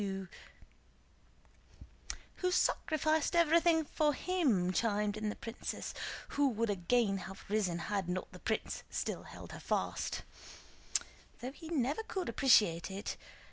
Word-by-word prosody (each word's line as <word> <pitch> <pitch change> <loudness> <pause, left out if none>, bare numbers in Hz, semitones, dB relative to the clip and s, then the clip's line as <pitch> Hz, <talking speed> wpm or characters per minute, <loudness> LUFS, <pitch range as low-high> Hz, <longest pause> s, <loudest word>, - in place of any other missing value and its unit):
"Who 365 - +1
sacrificed 315 -3 +2
everything 335 -1 +5
for 295 -1 +2
him," 255 - +2
chimed 210 -1 +1
in 215 0 -1
the - - -3
princess, 230 +1 -5 0.4
who 285 -1 +3
would 230 -2 0
again 200 +2 +2
have 190 - -10
risen 200 -5 +1
had 190 +1 -2
not 185 +1 -2
the - - -11
prince - - -1
still - - -2
held - - -10
her - - -7
fast, - - -1 1.2
"though 250 +2 -4
he 320 +3 -10
never 290 - +1
could 380 -5 -3
appreciate 210 - +4
it. 195 +2 -4
235 Hz, 125 wpm, -34 LUFS, 200-315 Hz, 1.2 s, everything